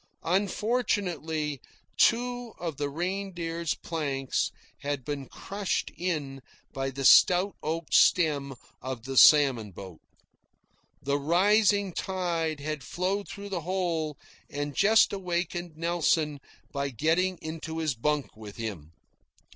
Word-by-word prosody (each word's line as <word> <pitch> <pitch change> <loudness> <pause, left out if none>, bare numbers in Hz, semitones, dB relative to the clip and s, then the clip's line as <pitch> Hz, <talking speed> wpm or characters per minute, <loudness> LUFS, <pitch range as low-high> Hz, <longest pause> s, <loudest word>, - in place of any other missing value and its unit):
Unfortunately 180 - -1 0.3
two 245 0 +2
of 165 -5 -5
the 145 -1 -2
Reindeer's 170 -1 -3
planks 140 -5 -2 0.3
had 140 -3 -3
been 140 -3 -4
crushed 200 -1 -3
in 150 -7 -3 0.3
by 135 0 -2
the 135 0 -4
stout 185 +7 +6
oak 160 0 -3
stem 145 -6 +4 0.3
of 130 -3 -5
the 135 +1 -5
salmon 130 -7 +6
boat. 95 -2 -11 1.0
The 140 +1 0
rising 200 +5 +3
tide 170 -5 -2
had 150 -1 -4
flowed 190 +8 -2
through 200 0 -8
the 185 -3 -3
hole, 165 -4 -2 0.3
and 145 0 -4
just 220 - +5
awakened 175 -3 -3
Nelson 160 -3 +1 0.3
by 140 -1 -2
getting 165 +9 +1
into 160 0 -6
his 160 -3 0
bunk 145 +4 -1
with 105 -2 -10
him. 95 -9 -6
160 Hz, 115 wpm, -28 LUFS, 140-185 Hz, 1.0 s, stout